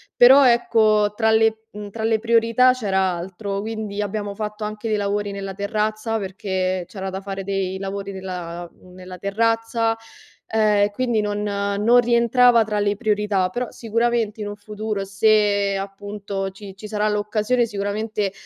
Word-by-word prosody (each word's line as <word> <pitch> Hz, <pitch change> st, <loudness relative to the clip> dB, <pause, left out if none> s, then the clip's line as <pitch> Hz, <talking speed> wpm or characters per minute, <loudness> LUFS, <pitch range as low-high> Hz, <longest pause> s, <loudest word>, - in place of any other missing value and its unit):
però 265 Hz, +3 st, +8 dB
ecco, 215 Hz, -3 st, +3 dB
tra 220 Hz, 0 st, +2 dB
le, 220 Hz, 0 st, +2 dB
mhmm, 205 Hz, 0 st, -8 dB
tra 220 Hz, +1 st, -5 dB
le 225 Hz, 0 st, +2 dB
priorità 230 Hz, +2 st, +4 dB
c'era 200 Hz, -6 st, -1 dB
altro, 190 Hz, +3 st, -4 dB
quindi 215 Hz, -1 st, -4 dB
abbiamo 205 Hz, 0 st, -3 dB
fatto 210 Hz, 0 st, -5 dB
anche 215 Hz, +2 st, -5 dB
dei 215 Hz, -, +1 dB
lavori 205 Hz, 0 st, -1 dB
nella 195 Hz, -1 st, -5 dB
terrazza, 215 Hz, +2 st, -2 dB
perché 185 Hz, -2 st, -2 dB
c'era 195 Hz, -2 st, -6 dB
anche 190 Hz, 0 st, -4 dB
da -, -, -6 dB
fare 195 Hz, 0 st, -5 dB
dei 190 Hz, -1 st, -2 dB
lavori 195 Hz, +1 st, -5 dB
nella 175 Hz, -2 st, -6 dB
mhmm, 180 Hz, -, -19 dB
nella 185 Hz, 0 st, -10 dB
terrazza, 225 Hz, +2 st, 0 dB, 0.5 s
ehm, 210 Hz, -2 st, +3 dB
quindi 240 Hz, -3 st, 0 dB
non 205 Hz, 0 st, -2 dB
non 205 Hz, +3 st, +2 dB
rientrava 235 Hz, 0 st, +4 dB
tra 210 Hz, -1 st, -2 dB
le 205 Hz, 0 st, +1 dB
priorità, 205 Hz, -3 st, 0 dB
però, 245 Hz, +5 st, -3 dB
sicuramente, 230 Hz, -1 st, -1 dB
in 205 Hz, -, -3 dB
un 205 Hz, -, -5 dB
futuro, 210 Hz, -1 st, -4 dB
se, 205 Hz, 0 st, +2 dB
appunto 195 Hz, 0 st, -5 dB
ci 195 Hz, 0 st, -11 dB
ci 210 Hz, -, -8 dB
sarà 210 Hz, 0 st, 0 dB
l'occasione, 210 Hz, +3 st, +1 dB
sicuramente, 205 Hz, 0 st, -2 dB
210 Hz, 160 wpm, -22 LUFS, 195-220 Hz, 0.5 s, però